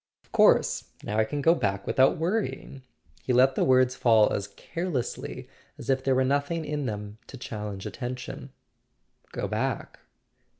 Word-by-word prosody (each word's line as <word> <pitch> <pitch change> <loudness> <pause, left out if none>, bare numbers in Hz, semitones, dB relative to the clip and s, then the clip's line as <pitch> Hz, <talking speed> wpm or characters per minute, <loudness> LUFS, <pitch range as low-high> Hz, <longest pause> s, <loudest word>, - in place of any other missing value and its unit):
"Of - - -31
course. - - +4 0.2
Now 105 +1 -1
I 110 - +4
can 145 +5 -4
go 165 - +6
back 100 - -1
without 130 +1 +3
worrying." 170 -6 -2 0.4
He 125 - -1
let 130 +2 +5
the - - +1
words 130 -1 +4
fall 110 -3 +4
as 100 - -2
carelessly 130 - -4 0.3
as - - -2
if 130 0 0
there 135 -1 +2
were 130 - +3
noth¬ 140 +2 +1
ing 165 -2 -2
in 145 -2 -2
them 105 0 -6
to 135 - -10
challenge 105 -5 -6
attention. 125 -1 -6 0.8
"Go - - -3
back?" - - -3
130 Hz, 165 wpm, -27 LUFS, 110-140 Hz, 0.8 s, go